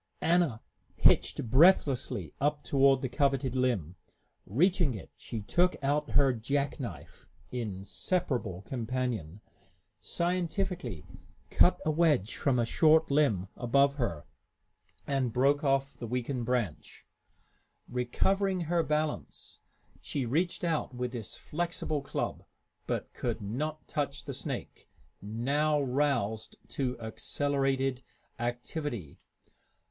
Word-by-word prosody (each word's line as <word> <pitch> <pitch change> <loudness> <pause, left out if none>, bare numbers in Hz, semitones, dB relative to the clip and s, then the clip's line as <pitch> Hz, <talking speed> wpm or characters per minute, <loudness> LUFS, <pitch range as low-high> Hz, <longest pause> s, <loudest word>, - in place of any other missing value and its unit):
Anna 165 -9 +2 0.3
hitched - - +3
breathlessly 130 - +4
up 145 +1 +1
toward 135 -1 +4
the - - +1
coveted 135 -1 +1
limb. 110 - 0 0.5
Reaching 170 - +2
it, 95 - -9
she 115 - -6
took 175 - +2
out 145 +2 +1
her 135 -2 +4
jack 140 +6 -1
knife, 115 -10 -8 0.2
inseparable 105 - -2
companion, 115 - -3 0.6
scientifically 175 - -2 0.5
cut - - +5
a 155 - +3
wedge 150 - +2
from 135 -3 +1
a 120 - +2
short 160 +5 +4
limb 135 -11 +2
above 140 +3 +3
her, 85 - -2 0.8
and 135 -4 0
broke 140 +5 +3
off 135 0 +1
the 120 - -6
weakened 125 +1 -2
branch. 120 -10 -2 0.8
Recovering 185 +10 +1
her 170 +1 +1
balance, 150 -1 -3 0.4
she 135 -3 -2
reached 170 +11 0
out 160 -6 -1
with 125 0 -2
this 115 -5 -6
flexible 165 -2 -2
club, 140 - -3 0.4
but - - -3
could 120 -2 -2
not 145 +10 -4
touch 140 -1 -3
the - - -4
snake, - - -6 0.3
now 140 +9 +1
roused 130 -6 0
to 125 -3 -2
accelerated 135 +3 -1 0.4
activity. 120 - -4
135 Hz, 110 wpm, -30 LUFS, 120-150 Hz, 0.8 s, cut